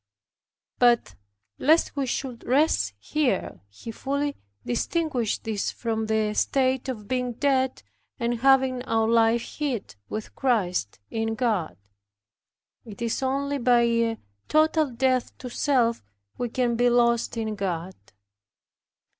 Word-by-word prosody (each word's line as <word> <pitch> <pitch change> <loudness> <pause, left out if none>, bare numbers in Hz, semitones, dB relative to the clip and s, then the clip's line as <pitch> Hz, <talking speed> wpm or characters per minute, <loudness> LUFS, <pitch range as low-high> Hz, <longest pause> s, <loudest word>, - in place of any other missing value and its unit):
But, 240 -1 +4 0.5
lest 315 +2 +3
we 275 -2 -1
should 250 -1 -4
rest 255 - +2
here, 255 - -1
he 100 - -9
fully 280 +4 -2 0.3
distinguishes 250 - -1
this 215 -3 -2
from 220 -2 -3
the 215 -1 +1
state 260 +3 +1
of 215 -5 -5
being 250 0 -1
dead 265 0 0 0.4
and 235 -1 -1
having 265 -1 +4
our 225 -2 +1
life 230 0 +3 0.2
hid 270 -8 -3
with 215 0 -5
Christ 185 - 0
in 225 0 -1
God. 210 - -1 1.1
It 210 -4 -11
is 230 +2 -1
only 280 +2 -1
by 245 -1 +4
a 230 -1 +1 0.3
total 310 -1 +3
death 255 0 0
to 250 -1 -8
self 240 -4 +1 0.3
we 245 - -3
can 240 0 0
be 245 +1 +3
lost 235 -1 +2
in 220 -1 -2
God. 190 -3 -3
240 Hz, 125 wpm, -25 LUFS, 225-265 Hz, 1.1 s, But